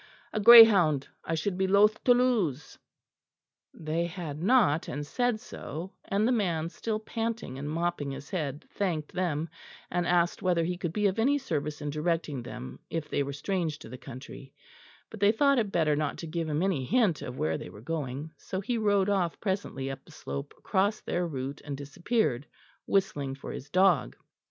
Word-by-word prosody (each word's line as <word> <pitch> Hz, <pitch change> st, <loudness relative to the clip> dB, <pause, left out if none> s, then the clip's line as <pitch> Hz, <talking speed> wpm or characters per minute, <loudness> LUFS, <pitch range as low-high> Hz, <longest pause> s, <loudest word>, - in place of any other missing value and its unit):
A 215 Hz, -, 0 dB
greyhound 205 Hz, -, +8 dB, 0.2 s
I 165 Hz, -, -2 dB
should 180 Hz, +4 st, -2 dB
be 190 Hz, -, +2 dB
loath 205 Hz, +2 st, +4 dB
to 245 Hz, -, +7 dB
lose." 200 Hz, -, 0 dB, 0.9 s
They 165 Hz, +2 st, -2 dB
had 165 Hz, -4 st, -6 dB
not, 190 Hz, -, +3 dB
and 145 Hz, +3 st, -4 dB
said 245 Hz, -, 0 dB
so; 180 Hz, -6 st, -7 dB
and 205 Hz, +3 st, +1 dB
the -, -, +2 dB
man, 170 Hz, -9 st, 0 dB
still 215 Hz, +4 st, -3 dB
panting 225 Hz, -, -4 dB
and 145 Hz, +1 st, -4 dB
mopping 165 Hz, -2 st, -1 dB
his 140 Hz, +4 st, -8 dB
head, 150 Hz, -6 st, -3 dB
thanked 165 Hz, -7 st, -2 dB
them, 165 Hz, -4 st, -1 dB, 0.4 s
and 175 Hz, -1 st, 0 dB
asked 175 Hz, +1 st, +2 dB
whether 180 Hz, -3 st, +2 dB
he 180 Hz, +2 st, -1 dB
could 175 Hz, -2 st, -3 dB
be 210 Hz, +4 st, -1 dB
of 200 Hz, +2 st, +1 dB
any 275 Hz, +6 st, +3 dB
service 155 Hz, -, -3 dB
in 145 Hz, -, -2 dB
directing 155 Hz, -3 st, -1 dB
them, 65 Hz, -, -8 dB
if 165 Hz, -2 st, -4 dB
they -, -, +1 dB
were 140 Hz, 0 st, -2 dB
strange 160 Hz, +1 st, -2 dB
to 155 Hz, -, -12 dB
the 125 Hz, -, -8 dB
country; 135 Hz, +1 st, -10 dB, 0.6 s
but 220 Hz, -, -9 dB
they 200 Hz, +1 st, +5 dB
thought 275 Hz, +3 st, +3 dB
it 210 Hz, -4 st, -1 dB
better 155 Hz, -4 st, +2 dB
not 150 Hz, 0 st, -2 dB
to -, -, -6 dB
give 165 Hz, 0 st, -3 dB
him 150 Hz, +3 st, 0 dB
any 185 Hz, -9 st, 0 dB
hint 210 Hz, -, +2 dB
of 125 Hz, +1 st, -6 dB
where 80 Hz, 0 st, 0 dB
they -, -, -8 dB
were 100 Hz, -, -12 dB
going, 145 Hz, +2 st, -4 dB
so 190 Hz, -, -5 dB
he 230 Hz, +4 st, -2 dB
rode 205 Hz, -2 st, +2 dB
off 190 Hz, -5 st, 0 dB
presently 190 Hz, -9 st, -2 dB
up 135 Hz, -, -8 dB
the -, -, -17 dB
slope 70 Hz, 0 st, -6 dB
across 205 Hz, +3 st, 0 dB
their 175 Hz, 0 st, -2 dB
route 135 Hz, -2 st, -5 dB
and 145 Hz, -2 st, -5 dB
disappeared, 145 Hz, -, -1 dB, 0.4 s
whistling 145 Hz, -9 st, 0 dB
for 135 Hz, -, -8 dB
his 140 Hz, -, -8 dB
dog. 185 Hz, -, +3 dB
170 Hz, 190 wpm, -29 LUFS, 145-200 Hz, 0.9 s, greyhound